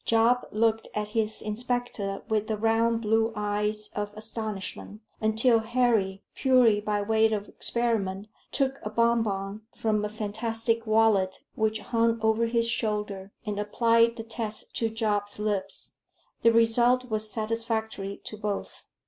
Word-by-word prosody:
Job 230 +2 +3
looked 225 +1 +1
at 210 0 -2
his 215 0 -1
inspector 215 -3 -2
with 215 -1 0
the 220 - -1
round 225 +1 +2
blue 225 +1 +2
eyes 210 0 -1
of 205 0 -2
astonishment, 215 -1 -6 0.2
until 220 +2 +4
Harry, 220 -4 +1
purely 250 -6 +4
by 210 0 0
way 220 +1 +3
of 210 -1 -2
experiment, 215 -4 0 0.2
took 275 0 0
a 210 - -4
bon 235 +1 +3
bon 195 -1 -3
from 215 -2 0
a 210 - -1
fantastic 225 +2 -2
wallet 215 -4 +3
which 220 0 0
hung 230 +1 +1
over 220 +1 +3
his 230 0 +1
shoulder, 210 -4 -2
and 205 -1 -3
applied 230 +2 +3
the 225 - -6
test 220 -1 -5
to 225 - 0
Job's 210 -2 -1
lips. 205 -2 -3 0.4
The 230 - +6
result 240 +2 +3
was 215 0 -1
satisfactory 220 -2 -3
to 215 - -6
both. 210 -1 -4
220 Hz, 140 wpm, -27 LUFS, 210-230 Hz, 0.4 s, The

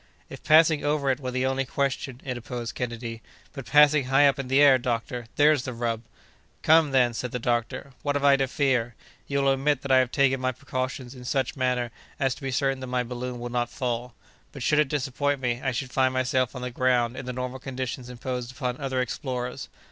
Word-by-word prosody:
"If - - -9
passing 155 -1 +5
over 145 -2 +1
it 130 - -2
were 130 -2 -4
the 130 +1 -1
only 135 0 0
question!" 135 -1 -2
interposed 120 -2 -5
Kennedy; 115 -2 -5 0.3
"but 135 -4 -8
passing 150 -1 +5
high 135 +2 +5
up 140 - +1
in 135 - -4
the 135 +2 +3
air, 140 -3 +7
doctor, 120 0 -3
there's 150 -1 +4
the 130 0 -5
rub!" 115 -1 -2 0.6
"Come, 160 -1 +5
then," 125 -3 +3
said 125 +2 -3
the - - -2
doctor, 120 +3 -2
"what 145 -1 -1
have 145 - -1
I 140 -1 +6
to 135 -1 +1
fear? 125 -4 0 0.3
You 140 0 0
will 135 0 +4
admit 135 0 0
that 140 - -3
I 130 - +7
have 130 -1 +1
taken 135 -2 +2
my 130 0 0
precautions 130 0 -4
in 125 -2 -11
such 130 0 -1
manner 125 -3 0 0.3
as 135 -3 +1
to - - -14
be 135 - -3
certain 135 +1 0
that 130 - -6
my 125 0 0
balloon 125 0 -5
will 120 0 -5
not 120 -1 -1
fall; 120 -2 -3 0.4
but, 135 - -7
should 150 +3 +3
it 150 -3 +2
disappoint 145 0 -1
me, 120 -1 -1
I 130 - +1
should 125 +1 -4
find 130 -1 +2
myself 130 0 0
on 125 - -6
the 125 - -4
ground 125 -1 +1
in 130 - -7
the - - -2
normal 125 +1 -4
conditions 130 -1 -5
imposed 125 0 -5
upon 130 -2 -3
other 130 -2 -1
explorers. 125 +1 -4
130 Hz, 220 wpm, -26 LUFS, 125-135 Hz, 0.6 s, air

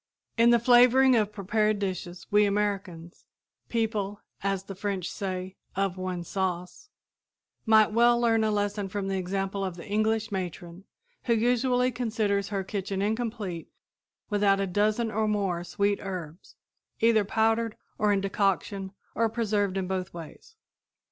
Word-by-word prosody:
In 230 +1 +5
the 240 - +6
flavoring 250 +2 +6
of 210 -2 +2
prepared 210 +1 0
dishes 185 -3 -4
we 210 0 +5
Americans 200 -5 -3 0.4
people, 215 -3 -1 0.2
as 195 -1 -1
the 195 - -8
French 195 -2 -3
say, 185 -1 -5 0.2
"of 195 -1 0
one 185 -2 -4
sauce" 185 - -4 0.8
might 220 -1 +6
well 235 +2 +4
learn 225 -2 +3
a 220 - +2
lesson 205 -1 -1
from 195 0 -3
the 195 - -1
example 195 +1 -2
of 185 -2 -3
the 170 - -10
English 220 +1 0
matron 180 -1 -5 0.4
who 235 - +3
usually 250 +2 +2
considers 215 -5 -1
her 195 -2 -2
kitchen 195 -1 -3
incomplete 210 -4 -3 0.6
without 205 -2 +2
a 195 - +1
dozen 210 +4 +1
or 215 0 0
more 195 -5 0
sweet 200 +3 0
herbs, 180 -4 -7 0.4
either 225 -2 +4
powdered, 225 +2 +1 0.2
or 210 -1 +3
in 200 -1 +2
decoction, 195 0 -1 0.2
or 230 0 +1
preserved 205 -4 0
in 190 - -1
both 185 -2 -3
ways. 170 - -11
205 Hz, 145 wpm, -27 LUFS, 190-220 Hz, 0.8 s, the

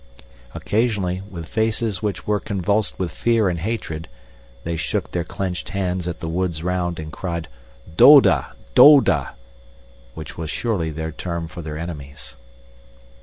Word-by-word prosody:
Occasionally, 100 -5 0
with 85 -4 -7
faces 110 -1 -1
which 105 -2 -3
were 105 -1 +1
convulsed 100 +1 -1
with 90 -2 -2
fear 115 -3 +1
and 85 -1 -2
hatred, 85 -5 -4 0.6
they 85 0 -3
shook 80 - -2
their 85 - -1
clenched 90 -3 -4
hands 90 -2 -2
at 85 0 -5
the 85 - -4
woods 85 -1 -2
round 90 -1 -1
and 80 0 -7
cried: 85 -3 -4 0.5
"Doda! 135 - +7 0.2
Doda!" 95 - +6 0.8
which 80 - -8
was 80 -2 -4
surely 95 -5 -1
their 80 +1 -4
term 85 +1 -4
for 80 +2 -9
their 75 -1 -6
enemies. 75 -4 -8
90 Hz, 140 wpm, -21 LUFS, 80-105 Hz, 0.8 s, Doda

